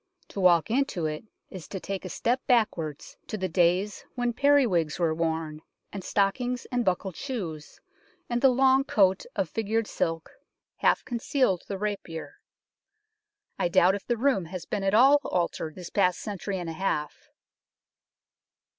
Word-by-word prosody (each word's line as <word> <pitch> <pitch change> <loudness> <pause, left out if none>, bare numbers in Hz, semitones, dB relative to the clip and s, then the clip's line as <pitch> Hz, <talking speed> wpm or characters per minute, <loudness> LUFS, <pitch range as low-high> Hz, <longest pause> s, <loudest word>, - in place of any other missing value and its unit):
To - - -6
walk 180 0 +4
into 245 - 0
it 155 +5 -4 0.3
is 185 -4 -9
to 190 - -5
take 195 +1 -5
a - - -5
step 245 +8 0
backwards 170 - 0
to 215 - -4
the 185 -1 -1
days 180 +3 +1
when 245 -1 0
periwigs 230 - +3
were 165 -2 +1
worn, 160 -1 -2 0.3
and 195 -2 -6
stockings 245 +7 0
and 245 -1 +1
buckled 185 -2 -1
shoes, 175 - -6 0.5
and 240 0 -1
the 270 - +7
long 265 +1 +4
coat 190 -7 +2
of 195 -3 0
figured 225 +3 -1
silk 165 -5 -3 0.5
half - - +2
concealed 240 - 0
the 200 - -4
rapier. 195 -5 -5 1.2
I - - +2
doubt 175 +2 +4
if 200 - -5
the 240 - 0
room 250 -7 +1
has 175 0 -7
been 205 - -3
at 195 +1 +2
all 275 +5 +6
altered 170 -3 -2
this 180 -2 -9
past 180 -3 +2
century 200 -2 -4
and 175 -2 -5
a - - -6
half. 155 -4 -3
195 Hz, 155 wpm, -27 LUFS, 170-240 Hz, 1.2 s, the